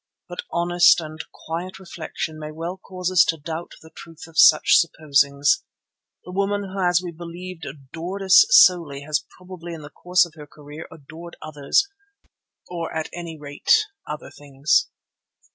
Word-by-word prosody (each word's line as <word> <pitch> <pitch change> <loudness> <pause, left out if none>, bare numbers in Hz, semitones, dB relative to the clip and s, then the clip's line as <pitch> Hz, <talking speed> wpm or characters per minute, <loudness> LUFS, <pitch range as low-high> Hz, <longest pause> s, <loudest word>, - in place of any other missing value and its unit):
But 175 - -6
honest 175 +1 +4
and 155 -1 -8 0.3
quiet 170 +3 -5
reflection 165 -3 -6
may 155 0 -7
well 165 +4 -5
cause 185 -1 -5
us 185 - +6
to 165 - -1
doubt 160 +3 -7
the 160 - -15
truth 165 0 -13
of 165 -1 -17
such 160 -1 +6
supposings. 145 - +1 0.6
The 180 - -9
woman 200 +2 -1
who 195 - -5
as 180 -1 +2
we 175 - -5
believed 170 0 -9
adored 160 +8 -7
us 190 - +8
solely 170 - +5
has 150 0 -1
probably 180 -2 -9
in 155 - -10
the 145 - -11
course 180 +2 +2
of 170 - -15
her 150 -2 -12
career 150 +1 -11
adored 160 +3 -12
others, 150 - 0 0.8
or 170 -2 -5
at 160 -1 -4
any 170 -2 -7
rate 145 - +2 0.3
other 150 0 -7
things. 140 -1 0
165 Hz, 160 wpm, -22 LUFS, 155-180 Hz, 0.8 s, us